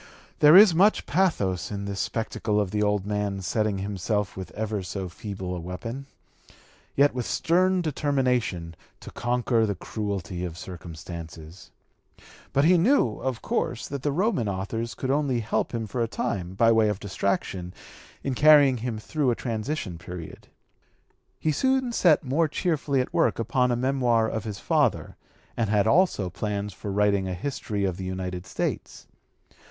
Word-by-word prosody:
There 150 +2 +8
is 205 -3 +9
much 195 +6 +4
pathos 125 - 0
in 100 -1 -4
this 100 -1 -4
spectacle 110 -1 -1
of 100 -3 -1
the 105 - 0
old 105 -2 +1
man 105 -1 -2
setting 105 +2 0
himself 100 +1 -2
with 95 -1 -6
ever 110 -1 -2
so 95 0 -5
feeble 95 0 -6
a - - -4
weapon, 115 +10 -6 0.9
yet 145 +1 +4
with 125 -2 -3
stern 180 +2 +2
determination, 125 - 0 0.2
to - - -10
conquer 120 -1 +1
the 100 - -1
cruelty 95 -2 -4
of 85 -2 -5
circumstances. 85 -1 -9 0.8
But 140 +2 +3
he 175 +1 +5
knew, 175 - +3
of 130 -3 -3
course, 120 - -2
that 140 -1 -4
the 145 - 0
Roman 160 - 0
authors 110 +5 -3
could 130 - -2
only 140 -4 +1
help 110 - -1
him 115 -2 -3
for 120 +4 -3
a 115 - +1
time, 95 -6 -3
by 115 +3 +4
way 110 -1 +4
of 105 -2 -2
distraction, 95 -2 -2 0.5
in 135 - -1
carrying 145 -1 +6
him 115 -1 -3
through 140 +5 -1
a 120 - +2
transition 110 - -4
period. 85 -1 -9 0.9
He 155 - +1
soon 260 - +1
set 175 -9 +4
more 145 +5 +1
cheerfully 150 -4 0
at 125 - -6
work - - +2
upon 125 +3 +1
a - - +2
memoir 120 -3 +2
of 110 0 -4
his 105 -2 -5
father, - - 0 0.4
and 115 -3 0
had 105 -1 +3
also 115 - +2
plans 105 -1 -3
for 100 - -6
writing 100 -1 +2
a 90 - -3
history 105 -2 -3
of 95 -2 -2
the 95 - -5
United 95 0 -4
States. - - -4
110 Hz, 165 wpm, -26 LUFS, 95-135 Hz, 0.9 s, is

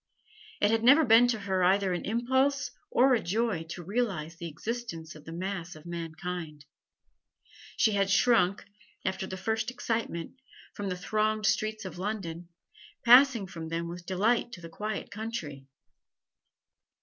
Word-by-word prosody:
It 205 - +3
had 225 0 +1
never 285 +6 +7
been 230 +1 +7
to 225 -3 -1
her 190 -2 0
either 190 +1 +3
an 175 - -3
impulse 260 +5 +1 0.2
or 260 +2 +4
a 235 - +2
joy 210 0 0
to 175 +1 -6
realise 190 -6 -2
the 170 +1 -6
existence 165 -1 -5
of 155 -1 -14
the 165 - -8
mass 175 -1 -4
of 155 +1 -14
mankind; 165 -2 -6 1.1
she 220 - +4
had 200 -1 +1
shrunk, 200 -3 +3 0.4
after 190 0 -2
the 190 - -6
first 220 +4 -1
excitement, 230 -3 -3 0.3
from 205 -1 -4
the 180 - -3
thronged 215 +3 0
streets 215 0 0
of 180 -1 -7
London, 175 -4 -4 0.6
passing 245 -3 +7
from 165 -4 -7
them 165 +1 -2
with 175 +1 -8
delight 225 +6 +1
to - - -8
the 165 - -9
quiet 210 +4 -5
country. 175 - -6
195 Hz, 150 wpm, -29 LUFS, 170-225 Hz, 1.1 s, never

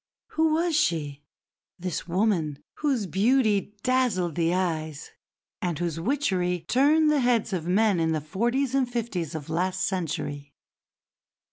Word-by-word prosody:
Who 320 0 +2
was 335 0 +1
she, 145 - 0 0.6
this 180 -2 -4
woman 170 -6 0
whose 270 -8 0
beauty 210 0 +2
dazzled 245 -10 +1
the 165 +1 +1
eyes 160 -5 -2 0.5
and 175 -4 -1
whose 165 -1 -2
witchery 180 - 0
turned 300 +4 +4
the 300 - +3
heads 240 -5 +1
of 170 -3 -2
men 200 0 +3
in 160 0 +1
the 155 - 0
forties 240 - -1
and 265 -2 +1
fifties 185 -10 -3
of 150 -3 -6
last 185 +3 0
century? 145 -6 -3
185 Hz, 135 wpm, -26 LUFS, 165-245 Hz, 0.6 s, turned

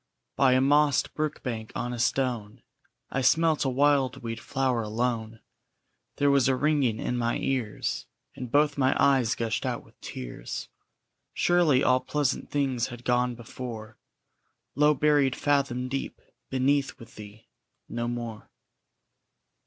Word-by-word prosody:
_ - - -57
By 130 -2 +4
a 130 - +4
mossed 145 +1 +3
brookbank 125 -7 -4
on 120 0 -3
a 120 - -5
stone 120 -3 -1 0.5
I 135 - -1
smelt 155 +3 +3
a - - +2
wildweed 130 -4 +1
flower 130 -3 -1
alone; 115 0 -2 0.7
There 145 0 +3
was 140 -2 +4
a 135 - +3
ringing 140 -5 +1
in 125 - -2
my 115 0 0
ears, 125 -6 -2 0.3
And 125 -3 -7
both 145 0 +2
my 130 0 +3
eyes 130 -4 +3
gushed 115 -1 -2
out - - -3
with - - -24
tears. - - -7 0.7
Surely 170 -7 +3
all 130 0 +4
pleasant 145 +1 -1
things 135 -4 0
had 120 -1 -10
gone 125 0 +1
before, 115 -2 -8 0.7
Low 150 +2 +4
buried 145 -2 +3
fathom 135 -3 0
deep 135 +1 -4 0.3
beneath 135 +1 +1
with 115 0 -14
thee, 105 +1 -12 0.4
NO 120 0 -3
MORE! 120 -2 -5
130 Hz, 135 wpm, -27 LUFS, 115-140 Hz, 0.7 s, By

